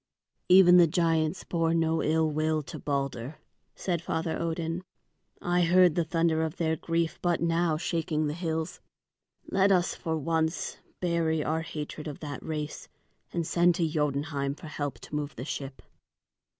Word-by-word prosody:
"Even 180 -1 +8
the 175 -1 +7
giants 165 +1 +1
bore 165 -1 0
no 165 0 +2
ill 160 +1 +2
will 155 0 0
to - - -8
Balder," 140 -1 -3 0.4
said 175 -4 -2
Father 160 -1 -2
Odin. 165 +1 -2 0.6
"I 175 0 +1
heard 180 0 +5
the 170 - +1
thunder 165 0 +1
of 160 +2 -2
their 160 -1 +1
grief 165 +1 -1
but 175 -2 +1
now 165 -1 +1
shaking 160 -2 -1
the 150 - -1
hills. 160 -1 -3 0.7
Let 195 +1 +4
us 180 -2 +3
for 160 -2 -3
this 150 -3 -4
once 160 0 0 0.2
bury 165 -3 +1
our 160 +2 0
hatred 155 -1 -6
of 145 - -6
that 145 -2 -5
race 150 -1 -5 0.4
and 170 -1 -1
send 175 +1 +3
to 165 -1 +1
Jotunheim 145 -2 -1
for 160 - -12
help 145 -2 -4
to - - -12
move 150 -1 -3
the 125 - -6
ship." 135 -2 -6
160 Hz, 165 wpm, -28 LUFS, 155-170 Hz, 0.7 s, Even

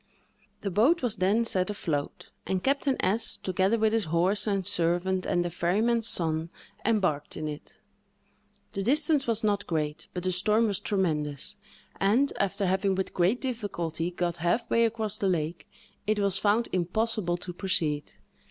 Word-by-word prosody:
The 200 - -3
boat 255 - +3
was 225 -4 0
then 200 +6 +2
set 185 -4 +1
afloat, 155 -8 -3 0.2
and 185 -1 -1
Captain 275 -1 +1
S——, 210 +5 +1
together 190 +4 +1
with 220 0 +2
his 225 -2 +1
horse 185 +6 +1
and 195 -3 0
servant, 180 +1 +1
and 175 0 +1
the 175 - -3
ferryman's 220 +7 +1
son, 160 -3 0 0.3
embarked 185 -10 0
in 155 -1 -3
it. 150 -1 -8 1.0
The 195 - -2
distance 290 +4 +2
was 230 -1 +2
not 205 -1 0
great, 150 -2 -2
but 180 - -3
the 185 - +1
storm 210 +5 +3
was 205 -4 +1
tremendous; 150 -8 -1 0.4
and, 230 +9 +3
after 200 +1 0
having 190 +1 +1
with 190 0 -3
great 185 +8 +2
difficulty 185 - -3
got 175 -1 -2
half 175 +8 0
way 230 0 +4
across 220 -2 -1
the 195 - +1
lake, 165 -1 -2 0.4
it 215 0 +2
was 200 -2 +1
found 215 +3 +2
impossible 185 0 0
to 180 0 -7
proceed. 160 -6 -1
190 Hz, 160 wpm, -28 LUFS, 175-220 Hz, 1.0 s, way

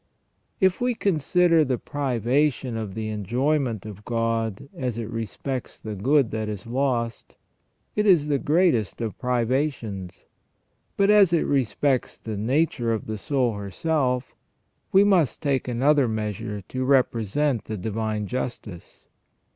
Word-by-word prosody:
If 190 +2 +2
we 245 -1 +1
consider 175 -3 +3
the 130 -3 0
privation 130 -1 0
of 110 -4 -4
the 110 -1 -3
enjoyment 120 +2 -1
of 105 -1 -9
God 115 -1 -1
as 125 -4 -3
it 115 -2 -3
respects 120 +3 -4
the 110 - -6
good 130 +5 +2
that 110 -1 -2
is 105 -2 -5
lost, 120 -2 -2 0.6
it 210 0 +1
is 170 -7 +5
the 145 -2 +1
greatest 155 - +2
of 115 -3 -3
privations; 120 -7 -2 0.7
but 200 +1 +4
as 200 -5 +6
it 170 - +3
respects 135 0 0
the 110 -2 -6
nature 120 +2 0
of 110 - -2
the 110 -1 -4
soul 130 -1 0
herself, 125 - -1 0.6
we 195 +1 +6
must 180 - +3
take 140 -3 0
another 135 +3 +3
measure 105 -1 -3
to 130 0 -2
represent 130 0 +1
the 110 - -4
divine 110 +1 -2
justice. 110 -5 -6
125 Hz, 135 wpm, -24 LUFS, 110-145 Hz, 0.7 s, as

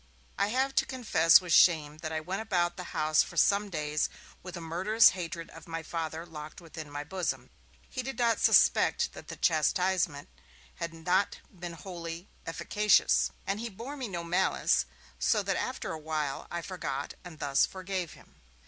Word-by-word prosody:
I 200 - +1
have 260 +5 0
to - - +4
confess 220 -11 +5
with 180 -2 -2
shame 155 -4 +5
that 160 -1 -5
I 160 - -1
went 190 +6 -3
about 175 -5 0
the 180 - -7
house 155 -1 +2
for - - -5
some 205 +1 +3
days 150 -3 -1 0.3
with 180 -1 -8
a - - -5
murderous 185 +7 +4
hatred 170 -2 -5
of 165 0 -13
my 165 -1 -4
Father 160 0 -4
locked 155 -1 -9
within 160 -3 -9
my 145 0 -5
bosom. 180 +1 -3 0.4
He 255 - -4
did 265 +1 -6
not 235 -2 +2
suspect - - +4
that - - -11
the - - -6
chastisement 170 -2 +1 0.5
had 170 - -3
not 180 +4 0
been 175 -2 -7
wholly 170 +1 -7 0.2
efficacious, 210 +5 +3 0.2
and 195 +2 -1
he 235 +1 -4
bore 235 +8 -7
me 260 -4 -4
no 175 -4 -4
malice; 170 - +2 0.3
so 65 - +2
that - - 0
after - - -3
a 160 - -5
while, 150 -3 -3
I 170 0 -4
forgot 145 -7 -4
and 175 -3 -10
thus 140 -2 +2
forgave 185 -3 -4
him. - - -20
170 Hz, 175 wpm, -30 LUFS, 155-190 Hz, 0.5 s, confess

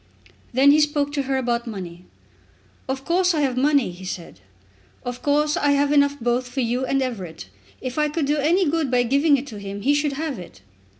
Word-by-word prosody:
Then 270 +3 +5
he 300 - +5
spoke 295 -1 +1
to 290 -1 -1
her 270 0 -1
about 240 -2 -1
money. 180 -5 -7 0.8
"Of 265 0 -3
course 360 0 +2
I 305 - +1
have 265 -3 0
money," 280 -4 +2
he 175 +2 -12
said. 180 -2 -7 0.7
"Of 245 0 -5
course 295 +1 +2
I 290 0 +2
have 285 0 +2
enough 285 -1 +3
both 245 +2 0
for 265 +1 -2
you 245 +2 0
and 270 +1 +1
Everett. 180 - -6 0.3
If 255 +3 -4
I 300 0 +2
could 300 0 -1
do 295 +2 +1
any 335 +5 +2
good 310 -2 0
by 245 -1 +3
giving 280 +4 +3
it 265 - -5
to 220 -7 -9
him, 200 0 -6
he 285 - +3
should 290 0 0
have 290 -4 -4
it." 135 - -12
275 Hz, 215 wpm, -23 LUFS, 240-295 Hz, 0.8 s, Then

